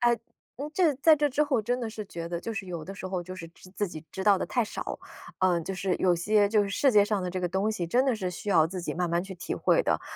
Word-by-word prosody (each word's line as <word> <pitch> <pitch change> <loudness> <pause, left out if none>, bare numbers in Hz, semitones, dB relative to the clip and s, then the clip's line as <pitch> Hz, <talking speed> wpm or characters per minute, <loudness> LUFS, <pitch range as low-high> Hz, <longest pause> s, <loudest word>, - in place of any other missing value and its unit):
哎， 240 0 +4 0.4
嗯， 290 +3 -5
这 335 -5 +3
在 310 +3 +6
这 295 0 +2
之 285 +2 +1
后 280 -6 +1
真 245 +4 -1
的 230 - -3
是 215 -1 -6
觉 170 -3 -6
得， 170 0 -3
就 230 - -4
是 200 - -4
有 170 -4 -5
的 195 - -7
时 190 -1 -6
候 185 -2 -2
就 185 +1 -8
是 165 -2 -8
知 175 +2 -17
自 205 +1 -2
己 155 -2 -9
知 190 - -4
道 200 -2 +5
得 - - -2
太 240 -3 +1
少。 - - -5 0.4
呃， 180 -2 +3
就 190 - -4
是 190 -1 -1
有 180 -2 +3
些 205 +4 +3
就 210 -1 +3
是 200 - -3
世 260 +6 +2
界 205 -1 +6
上 210 -2 0
的 180 - -3
这 185 +1 -3
个 180 - 0
东 195 +4 0
西， 175 -5 -3
真 250 +8 +3
的 265 - +2
是 185 -4 -3
需 205 - -7
要 160 -5 +5
自 185 0 -5
己 - - -4
慢 175 -1 -1
慢 170 +1 +1
去 190 -1 -8
体 180 - -5
会 - - +3
的。 - - +1
195 Hz, 330 characters per minute, -28 LUFS, 180-230 Hz, 0.4 s, 在